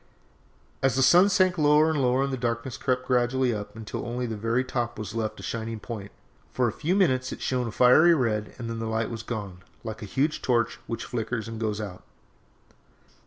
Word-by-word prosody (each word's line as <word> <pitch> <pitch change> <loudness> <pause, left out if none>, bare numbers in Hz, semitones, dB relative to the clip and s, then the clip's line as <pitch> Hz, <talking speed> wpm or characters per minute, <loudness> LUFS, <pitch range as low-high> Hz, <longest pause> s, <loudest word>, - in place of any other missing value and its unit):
"As 135 -2 +2
the 135 - +3
sun 175 +9 +6
sank 185 -2 +3
lower 150 +1 +5
and 150 -3 0
lower 130 +1 +2
the 135 -1 -2
darkness 120 0 -2
crept 130 0 -1
gradually 125 0 +2
up 105 -1 -6
until 110 -2 -6
only 125 +1 -3
the 115 -2 -3
very 115 +4 0
top 120 -2 -3
was 110 -1 -6
left 110 -1 -3
a - - -9
shining 115 -1 -4
point. 105 -4 -7 0.4
For 125 -1 +1
a - - 0
few 170 +5 -1
minutes 130 -10 +2
it - - -6
shone 125 -2 -1
a - - -4
fiery 140 +9 +6
red 110 -6 -1
and 115 - -6
then 115 0 -4
the 115 - -3
light 110 +1 -1
was 115 -1 -5
gone 100 -6 -6 0.2
like 110 0 -6
a - - -5
huge 140 +9 0
torch 120 -2 +1
which 115 - -4
flickers 115 -1 -3
and 115 -1 -6
goes 105 -1 -1
out. 100 -4 -6
120 Hz, 210 wpm, -26 LUFS, 110-130 Hz, 0.4 s, sun